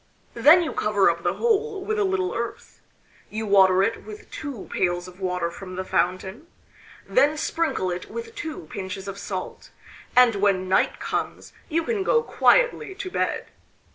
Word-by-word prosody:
Then 300 +9 +6
you 320 - -3
cover 205 -4 +3
up 170 0 -7
the 175 +1 0
hole 440 -3 0
with 430 +1 -1
a - - +3
little 380 -1 0
earth; - - -6 0.5
you 220 +1 -4
water 190 -2 +5
it 225 +3 -1
with 430 0 -11
two 280 -8 -7
pails 175 0 0
of 180 +1 -14
water 180 -2 -1
from 185 +1 -9
the 185 +1 -4
fountain, 190 - -1 0.6
then 310 -11 +3
sprinkle 310 - -1
it 175 +1 -5
with 465 -1 -7
two 320 - -6
pinches 190 0 -6
of 195 0 -6
salt, 190 -2 -6 0.5
and 250 -2 +7
when 195 -2 +1
night 190 - +2
comes - - -4 0.2
you 330 0 +1
can 425 +3 -1
go 465 +4 +2
quietly - - +2
to 375 -1 -6
bed. - - -2
220 Hz, 170 wpm, -24 LUFS, -, 0.6 s, and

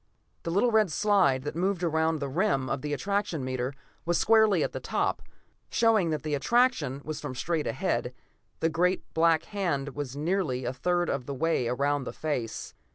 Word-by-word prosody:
The - - -4
little 205 +8 +2
red 215 -5 +3
slide 180 -8 +3
that 150 +1 -4
moved 180 +1 0
around 160 -1 +1
the 140 -2 -3
rim 135 -3 0
of 135 -1 -1
the 150 - -4
attraction 195 -2 -1
meter 130 0 -2 0.3
was 175 0 +1
squarely 220 -2 +4
at - - -2
the - - -5
top, - - -1 0.5
showing 220 -7 +3
that 155 -3 -2
the 155 -1 -2
attraction 235 - +2
was 155 0 -4
from 130 - -5
straight 160 +3 -1
ahead; - - -1 0.5
the 165 - +3
great 180 +3 +1
black 165 0 +3
hand 170 -9 -2
was 140 -2 -5
nearly 150 -6 -1
a 125 - -2
third 175 +6 0
of 125 - -2
the 140 - -4
way 160 -4 +1
around 140 +3 0
the - - -5
face. 130 -8 -3
160 Hz, 185 wpm, -28 LUFS, 140-190 Hz, 0.5 s, squarely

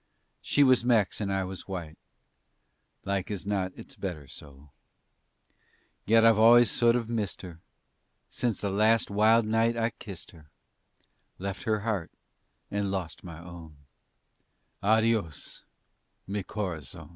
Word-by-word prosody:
She 145 - +3
was 130 -3 +4
Mex 110 -5 +2
and 100 -1 -1
I 95 0 0
was 95 0 -7
white; 85 -5 -6 1.1
Like 100 -1 -2
as 100 -3 -4
not 95 -2 -1
it's - - -12
better 80 -7 -6
so. 70 0 -14 1.4
Yet 115 +1 +5
I've 115 -2 +5
always 120 +2 +7
sort 120 -1 +3
of 120 -2 -1
missed 110 -7 -3
her 85 -3 -9 0.7
Since 120 -5 -2
that 100 - -1
last 110 +2 +3
wild 110 +2 +4
night 115 +2 +1
I 115 0 +1
kissed 100 -7 -10
her, 75 -4 -18 0.9
Left 100 +1 -5
her 110 -1 +1
heart 100 -6 -2 0.6
and 100 -1 -1
lost 90 -7 -4
my 85 -3 -9
own 85 -3 -11 1.0
"Adios, 110 -5 +1 0.6
mi 100 +1 -3
corazon!" 90 - -5
100 Hz, 135 wpm, -28 LUFS, 90-115 Hz, 1.4 s, always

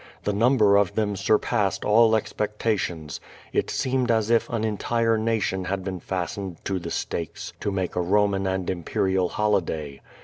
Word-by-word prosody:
The 105 - 0
number 105 -2 +4
of 100 -3 +1
them 105 -2 0
surpassed 100 0 +1
all 110 +1 +5
expectations. 105 -8 -2 0.3
It - - 0
seemed 130 -1 0
as 110 -1 +2
if 115 - +3
an 115 -2 -2
entire 115 +2 +1
nation 110 -4 0
had 95 0 -2
been 95 -1 -4
fastened 90 0 -4
to 95 -1 -1
the 85 -1 -6
stakes 85 -1 -4
to - - -2
make 95 -2 -2
a 90 - +1
Roman 100 +1 +2
and 95 -1 -2
imperial 95 +1 0
holiday. 80 -9 -1
100 Hz, 160 wpm, -25 LUFS, 95-110 Hz, 0.3 s, all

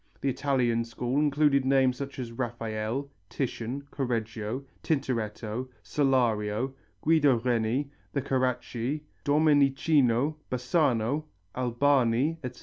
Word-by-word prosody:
The 140 - +1
Italian 125 -4 +1
school 120 +3 -2
included 145 -2 +3
names 130 -1 +3
such 140 +2 -6
as 125 -3 -5
Raphael, 115 +2 -3 0.2
Titian, 130 0 -3
Correggio, 115 -1 -3 0.2
Tintoretto, 120 -4 -2
Solario, 125 -3 +1 0.3
Guido 150 -4 +4
Reni, 120 +3 0 0.2
the 140 - -1
Carracci, 130 +1 -1 0.2
Domenichino, 145 -2 +3
Bassano, 130 0 +1 0.3
Albani, 130 +3 +2
etc. 125 -1 -6
130 Hz, 95 wpm, -28 LUFS, 115-140 Hz, 0.3 s, Guido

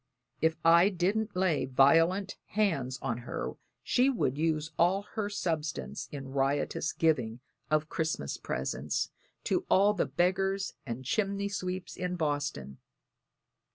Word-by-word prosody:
If 160 0 +3
I 170 +3 +7
didn't 205 +3 0
lay 180 -6 +2
violent 165 +9 +4
hands 160 -12 0
on 120 -3 -1
her 120 - -4 0.3
she 255 +2 +3
would 220 - 0
use 155 0 0
all 190 +4 +3
our 210 -2 -1
substance 160 -7 -3
in 135 -2 -6
riotous 140 +3 0
giving 125 -8 +1 0.3
of 155 0 +2
Christmas 160 - -2
presents 65 +3 -2 0.3
to - - 0
all 200 +2 +5
the 200 - 0
beggars 190 +6 0
and 120 +2 -5
chimney 200 - 0
sweeps 185 -1 -4
in 180 0 -2
Boston. 145 - -2
165 Hz, 125 wpm, -30 LUFS, 140-195 Hz, 0.3 s, I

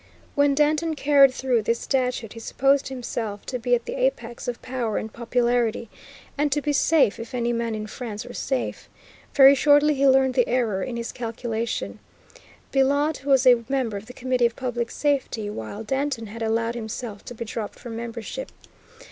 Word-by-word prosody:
When 285 -1 +3
Danton 310 +2 +2
carried 280 -2 +5
through 255 -3 0
this 230 +2 0
statute 250 -5 -1
he 230 - -9
supposed 275 +4 +1
himself 235 -5 -5
to 250 - -4
be 245 +1 +2
at 235 - -4
the 475 - -4
apex 240 - -2
of 245 -1 -3
power 245 -4 -2
and 220 - -5
popularity, 235 -1 0 0.5
and 295 0 +2
to 295 - +2
be 295 0 -1
safe, 290 -6 +3
if 230 +2 -7
any 240 -1 0
man 230 -1 -1
in 215 0 -4
France 215 -1 -6
were 245 - -9
safe. 265 -2 -3 0.5
Very 275 -1 +9
shortly 290 +2 +5
he 275 0 +2
learned 265 -1 +4
the 250 -2 +2
error 230 -6 +1
In 235 +3 -4
his 235 0 -4
calculation. 230 -1 -4 0.7
Billaud 285 +2 +2
was 270 -2 +4
a 245 -2 +6
member 260 -6 0
of 200 +2 -7
the 250 - -10
Committee 255 -1 +1
of 230 - -9
Public 245 -2 -3
Safety, 265 -7 -1
while 205 - -6
Danton 265 0 -2
had 225 +2 -9
allowed 225 +1 0
himself 220 -2 -6
to 245 - -8
be 230 - -5
dropped 220 -1 -5
from 235 -2 -8
membership. 235 - -6
245 Hz, 180 wpm, -24 LUFS, 230-270 Hz, 0.7 s, Very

